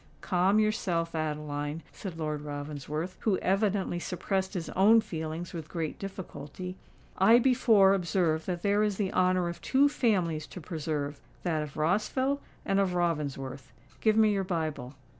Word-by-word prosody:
"Calm 185 +2 +2
yourself, 185 -6 +1
Adeline," 150 -1 -3
said 185 -5 -7
Lord 155 -2 -2
Ravensworth, 150 +3 -5
who 205 -4 +1
evidently 195 -2 0
suppressed 190 +2 -2
his 170 -3 -3
own 215 +5 +6
feelings 160 -3 -5
with 160 -3 -6
great 165 -3 -3
difficulty: 185 -2 -7 0.4
"I 225 +5 +7
before 230 -6 +5
observed 170 -3 0
that 175 -2 -3
there 205 +1 +3
is 210 -2 +1
the 200 -3 -1
honour 185 -1 +2
of 170 - -6
two 275 +2 +4
families 180 - 0
to - - -9
preserve—that 155 0 -3
of 150 -1 -7
Rossville 215 - +1 0.2
and 195 0 +2
of 190 -2 +1
Ravensworth. 140 -7 -2 0.3
Give 220 -1 +3
me 215 -1 +5
your 195 -1 0
Bible." 155 -7 -3
175 Hz, 145 wpm, -29 LUFS, 155-195 Hz, 0.4 s, I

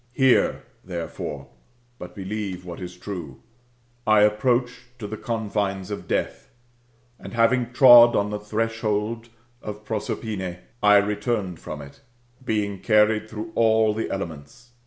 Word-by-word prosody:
Hear, 130 -1 +3 0.2
therefore, 85 -5 -6 0.5
but - - -9
believe 95 -2 -5
what 85 +1 -8
is 90 0 -8
true. 85 -10 -8 0.3
/ 120 0 -34
approached 120 +3 +2
to 115 - -7
the 105 +1 -5
confines 105 -4 -3
of 105 - -6
deaths - - -2 0.7
and - - -9
having 120 +1 +2
trod 120 -2 +8
on 100 +1 0
the 105 - -3
threshold 110 +1 -2 0.3
of 105 0 -8
Prosperine, 105 -4 -4 0.2
I 105 0 +6
returned 105 -3 -1
from 75 -1 -7
it^ 70 -1 -13 0.4
being 105 -4 -2
carried 105 +1 +3
through 110 +1 -7
all 110 -1 +3
the 110 +1 -2
elefnents. 90 +5 -7
105 Hz, 130 wpm, -24 LUFS, 100-115 Hz, 0.7 s, trod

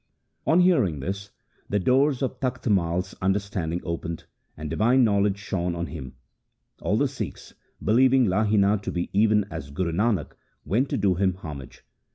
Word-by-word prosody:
2 - - +2
On 170 - +5
hearing 130 - +3
this 100 +7 -4 0.4
the 105 - +1
doors 130 +6 +2
of 130 -1 -3
Takht 125 -1 -3
Mai's 90 -2 +1
under 95 +1 +2
standing 90 -4 -3
opened, 85 -1 -4 0.3
and 75 +1 -5
divine 115 - +3
knowledge 100 -2 +2
shone 90 -4 -2
on 85 0 -2
him. 70 -7 -8 0.7
All - - +1
the - - +2
Sikhs, - - -7 0.3
believing 130 +4 +5
Lahina 105 +1 +2
to - - -4
be 85 0 -3
even 105 +1 +4
as 80 -4 -6
Guru 85 +4 -2
Nanak, 105 +3 0 0.3
went 125 +7 +1
to - - -1
do 100 -2 +2
him 95 0 +1
homage. 75 -7 -9
100 Hz, 170 wpm, -25 LUFS, 85-110 Hz, 0.7 s, On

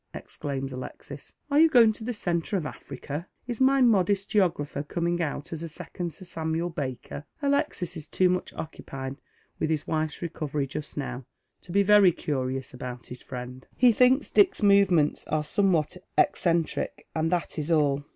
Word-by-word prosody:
exclaims 135 -2 -5
Alexis, 130 0 -9 0.2
"are 285 - +4
you 325 +1 +7
going 230 -6 +6
to 220 - -8
tlio 245 - -2
centre 175 0 -1
of 170 - -3
Africa? 150 +2 -6 0.2
Is 240 0 -5
my 270 +1 +5
modest 200 -3 +3
geographer 170 -9 +1
coming 170 +3 -1
out 145 -1 -3
as 160 - -5
a 170 - -4
second 170 +2 -5
Sir 185 - -10
Samuel 165 0 -2
Baker? 140 0 -5
" - - -40
Alexis 280 - 0
is 155 -2 -6
too 185 - +2
much 180 0 -1
occupied 135 -3 -7 0.4
with 155 - 0
his 155 -2 -1
wife's 155 +1 -2
recovery 150 -4 -2
j»>t 150 +2 -5
now 130 -2 -5 0.3
to 175 - -11
be 200 +2 +4
very 205 -2 +7
curious 130 -4 -3
about 125 -1 -7
his 125 - -8
friend. 125 0 -8
He 250 -1 +6
thinks 255 +5 +3
Dick's 390 - +4
movements 195 -7 +4
are 155 0 0
somewhat 180 -1 +1 0.2
eccentric, 170 -2 +1
and 160 +1 0
that 175 -2 -1
is 150 +2 -3
all. 145 -3 +2
165 Hz, 170 wpm, -27 LUFS, 145-200 Hz, 0.4 s, you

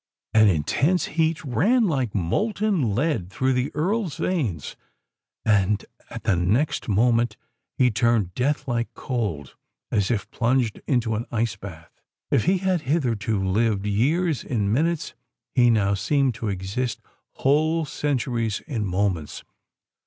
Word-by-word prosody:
An 110 -1 +6
intense 135 - +2
heat 160 0 +1
ran, 200 - +2
like 130 - -1
molten 175 - 0
lead, 125 - 0
through 130 +6 0
the 125 +1 0
Earl's 185 +2 -1
veins; 140 - -2 0.7
and, 105 -1 +2 0.2
at - - -8
the 95 - +2
next 105 - 0
moment, 115 +1 +2 0.4
he 125 -2 +4
turned 110 -5 +1
death 140 +8 -1
like 120 -2 -1
cold, 100 - -3 0.4
as 100 -2 +1
if 105 -3 -2
plunged 120 -2 0
into 120 -5 +1
an 110 +2 -3
ice 115 -2 0
bath. 90 -5 -11 0.3
If - - +2
he 185 +3 +3
had 185 -2 0
hitherto 120 -8 0
lived 105 0 +1
years 145 - +1
in 105 -4 -1
minutes—he 135 -5 0
now 105 -3 +3
seemed 135 +6 +1
to 110 0 -5
exist 100 +6 -3 0.3
whole 155 +4 +2
centuries 120 -7 -1
in 125 -9 -3
moments! 90 -4 -1
120 Hz, 130 wpm, -24 LUFS, 105-150 Hz, 0.7 s, An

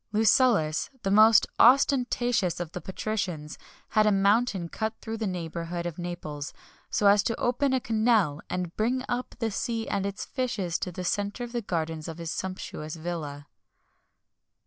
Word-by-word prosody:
Lucullus, 215 - +3
the 195 - 0
most 215 +2 +7
ostentatious 245 - +4
of 175 -2 -4
the 180 - -6
patricians, 185 -6 -4 0.3
had 215 0 +3
a - - +5
mountain 200 -1 +2
cut 220 +5 -3
through 225 - -6
in 225 - -4
the 220 - -1
neighbourhood 170 -1 -4
of 175 0 -5
Naples, 155 -5 -5 0.4
so 210 - 0
as 200 0 +6
to 230 - -2
open 255 +3 +1
a 260 - +2
canal 220 - +2
and 180 -2 -3
bring 250 +4 0
up 245 +1 -3
the 225 -2 -1
sea 230 +1 -2
and 200 -1 -1
its 200 +1 -5
fishes 215 -10 -2
to 180 - -3
the 180 +1 -6
centre 205 +5 -1
of 240 - -6
the 240 -1 -2
gardens 160 -5 -3
of 165 -1 -6
his 165 -1 -4
sumptuous 180 -4 -5
villa. 155 -4 -5
200 Hz, 170 wpm, -27 LUFS, 170-225 Hz, 0.4 s, most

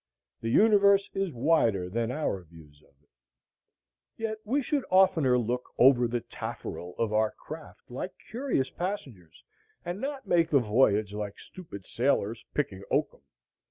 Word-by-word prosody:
The 115 - -3
universe 200 - +5
is 195 -2 -1
wider 120 - +2
than 115 +5 -2
our 140 -10 -2
views 80 -4 -17
of 70 - -27
it. - - -38 1.1
Yet 220 -1 -3
we 270 +6 0
should 285 +1 0
oftener 165 -9 +4
look 125 +1 -2
over 125 -1 +6
the 120 0 -2
tafferel 90 -4 -7
of 115 -2 -1
our 110 0 +3
craft, 155 -2 -11
like 180 +9 -5 0.2
curious 240 - -1
passengers, 135 - -6 0.4
and 175 +4 -4
not 275 -1 -4
make 165 -1 +3
the 145 - +4
voyage 105 -3 +2
like 105 -1 -5
stupid 130 - -11
sailors 115 -3 0
picking 100 -10 -1
oakum. - - 0
125 Hz, 145 wpm, -28 LUFS, -, 1.1 s, over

